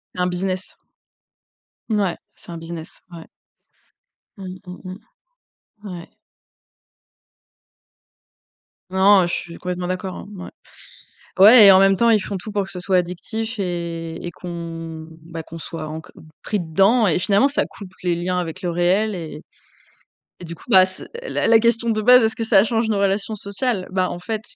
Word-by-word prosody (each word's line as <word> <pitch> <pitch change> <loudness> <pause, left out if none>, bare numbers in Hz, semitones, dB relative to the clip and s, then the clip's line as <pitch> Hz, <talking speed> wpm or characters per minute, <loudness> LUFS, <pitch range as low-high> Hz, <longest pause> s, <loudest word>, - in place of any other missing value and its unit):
Un 180 0 0
business. 185 +1 -3 1.1
Ouais, 205 -5 0 0.2
c'est - - -13
un 170 - -6
business, 165 0 -9
ouais. 165 -1 -10 1.1
Mmh 185 -1 -8
mmh, 180 0 -10
mmh. 185 +3 -8 0.9
Ouais. 175 -3 -8 2.8
Non, 190 0 +5
je 175 - -4
suis 170 - -5
complètement 180 0 -4
d'accord, 185 0 -4
hein, - - -9
ouais. 180 - -8 0.9
Ouais, 215 +3 +9
et 195 - +10
en 190 - +7
même 195 0 +5
temps, 235 +4 +3
ils 220 - +5
font 200 0 -4
tout 210 +4 -8
pour 205 -1 0
que 195 - -10
ce 180 - -6
soit 185 +1 +1
addictif 220 +6 -3
et 170 -3 -4
et 175 - -5
qu'on, 165 -2 -7 0.2
bah, 165 -1 -7
qu'on 165 +1 -10
soit 160 -1 -6
enco 155 +1 -8 0.3
pris 210 - -1
dedans 195 +8 +3
et 170 -1 +2
finalement, 200 +7 +3
ça 285 - 0
coupe 195 -3 -12
les 175 -1 +1
liens 180 +1 -1
avec 175 +2 -5
le 180 - -2
réel, 190 +5 +1
et 165 -3 -8 1.0
et - - -9
du 170 0 -7
coup, - - -18
bah, 190 -5 +7
c 185 0 -6 0.2
la - - -1
la 225 0 +6
question 235 0 +1
de 215 -1 0
base: 250 +2 +7
«Est-ce 220 +3 0
que 230 - -2
ça 205 -3 +5
change 225 0 0
nos 210 -2 0
relations 200 +2 0
sociales?» 200 0 -3
bah, 185 0 0
en - - -5
fait, 215 +4 -4
185 Hz, 170 wpm, -21 LUFS, 175-210 Hz, 2.8 s, et